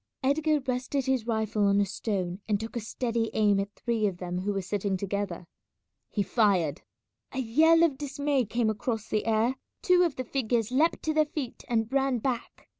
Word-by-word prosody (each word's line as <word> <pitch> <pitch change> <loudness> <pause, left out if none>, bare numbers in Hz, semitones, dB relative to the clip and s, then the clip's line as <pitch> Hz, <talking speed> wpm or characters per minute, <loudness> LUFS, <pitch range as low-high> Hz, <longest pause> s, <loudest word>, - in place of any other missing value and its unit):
Edgar 300 +3 +2
rested 255 +1 -2
his 260 -4 0
rifle 220 -2 0
on 200 0 +3
a 205 - +3
stone 190 -2 -3
and 205 -2 +2
took 225 +2 -6
a - - 0
steady 230 0 -2
aim 205 -2 +3
at 200 +1 -4
three 225 -3 0
of 185 -3 -3
them 180 0 -4
who 200 +3 -1
were 195 -1 -2
sitting 195 0 -1
together. 200 -2 -3 0.6
He 205 - 0
fired. 190 - +2 0.5
A - - -6
yell 315 +7 +4
of 290 -6 +2
dismay 285 -2 0
came 220 +1 +1
across 220 0 -3
the 215 +1 -1
air; 225 +4 +2 0.3
two 360 -1 +5
of 335 -6 +2
the 255 - -3
figures 240 -3 -1
leapt 305 +6 +2
to 315 - 0
their 310 0 +4
feet 285 -5 -5
and 225 -2 +1
ran 270 -2 +2
back. 240 0 -4
230 Hz, 190 wpm, -28 LUFS, 205-265 Hz, 0.6 s, two